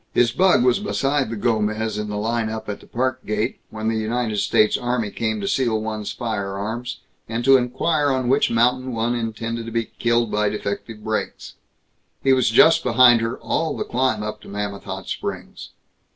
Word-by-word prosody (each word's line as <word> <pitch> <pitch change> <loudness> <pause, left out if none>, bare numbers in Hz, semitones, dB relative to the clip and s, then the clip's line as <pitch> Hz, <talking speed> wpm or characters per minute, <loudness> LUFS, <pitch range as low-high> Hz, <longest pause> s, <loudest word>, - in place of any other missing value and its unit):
His 120 -1 +4
bug 180 -1 +4
was 125 -1 +3
beside 135 +5 0
the 115 - -4
Gomez 110 -1 0
in 105 0 -4
the 105 - -3
line 115 +1 -1
up 110 0 -6
at 105 - -4
the - - -17
Park 130 +1 -2
gate, 110 +3 -2
when 110 0 -5
the 115 - +1
United 110 0 -1
States 105 +1 +3
Army 120 -4 -1
came 110 -2 -2
to 100 - -3
seal 120 -5 +1
one's 110 -1 -4
firearms, 110 +2 -4 0.3
and 115 +1 -2
to 135 0 +7
inquire 145 +4 +1
on 130 -2 0
which 135 +3 +3
mountain 125 +2 +1
one 115 +1 0
intended 115 0 -3
to - - -6
be 115 0 -2
killed 120 -1 +1
by 105 0 +1
defective 105 +1 -5
brakes. 110 0 -3 0.7
He 135 - +5
was 130 -2 +3
just 160 +8 +6
behind 120 -1 +6
her 115 +2 -2
all 160 -2 -1
the - - -1
climb 125 -4 0
up 105 0 -5
to - - -14
Mammoth 100 0 -5
Hot 95 -1 -6
Springs. - - -6
115 Hz, 190 wpm, -22 LUFS, 110-125 Hz, 0.7 s, to